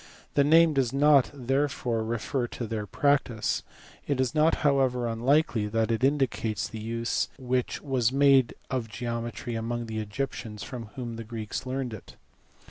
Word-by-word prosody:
The 140 - +4
name 160 +2 +6
does 135 -4 +1
not 140 -1 +5
therefore 130 -3 -1
refer 120 +3 -2
to 120 - -5
their 110 -1 -4
practice. 135 -3 +1 0.5
It 140 -3 0
is 130 0 +1
not 155 +1 +4
however 130 -3 +2
unlikely 120 -1 +2
that 115 +1 0
it 115 +2 -1
indicates 120 -7 +1
the 110 +2 -7
use 115 +2 -1
which 125 -1 -2
was 130 -5 +1
made 135 -3 +4 0.2
of 125 -4 -2
geometry 120 +1 -4
among 115 +1 -3
the 110 -1 -4
Egyptians 110 -1 -4
from 125 -3 -6
whom 120 -3 -5
the 115 - -5
Greeks 110 +2 -5
learned 130 -2 -3
it. 110 - -10
120 Hz, 155 wpm, -27 LUFS, 115-135 Hz, 0.5 s, name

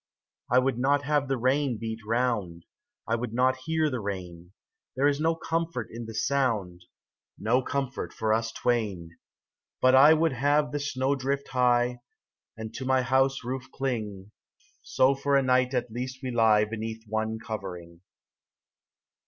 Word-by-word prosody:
I 125 - +4
would 130 -1 +2
not 140 +2 +2
have 145 -1 +1
the 135 0 0
rain 130 0 +1
beat 110 0 -5
round, 110 -7 -1 0.4
I 115 - 0
would 115 -1 -4
not 130 +1 +3
hear 160 -1 +1
the 130 -4 -2
rain; 90 -4 -6 0.4
There 135 +3 +3
is 145 0 +1
no 165 +1 +2
comfort 165 -7 -3
in 115 0 -7
the 115 - -8
sound, 110 -10 -1 0.5
No 120 +5 +2
comfort 135 0 -3
for 110 -1 0
us 115 0 0
twain. 105 -10 -1 0.7
But 130 0 +4
I 145 +4 +8
would 160 -2 +1
have 145 +3 +2
the 145 - -2
snow 140 -1 0
drift 140 +1 -2
high, 125 -1 +2 0.6
And 110 0 -7
to - - -6
my 130 0 +2
house 135 0 +2
roof 130 +2 -5
cling, 105 -7 -4 0.5
So 130 +1 +3
for 140 +1 0
a 135 - +2
night 130 0 +2
at 125 -2 -1
least 130 +3 -5
we 130 - -3
lie 110 -3 +4
Beneath 110 +1 -5
one 110 +1 -2
covering. 90 -6 -7
125 Hz, 160 wpm, -27 LUFS, 110-135 Hz, 0.7 s, I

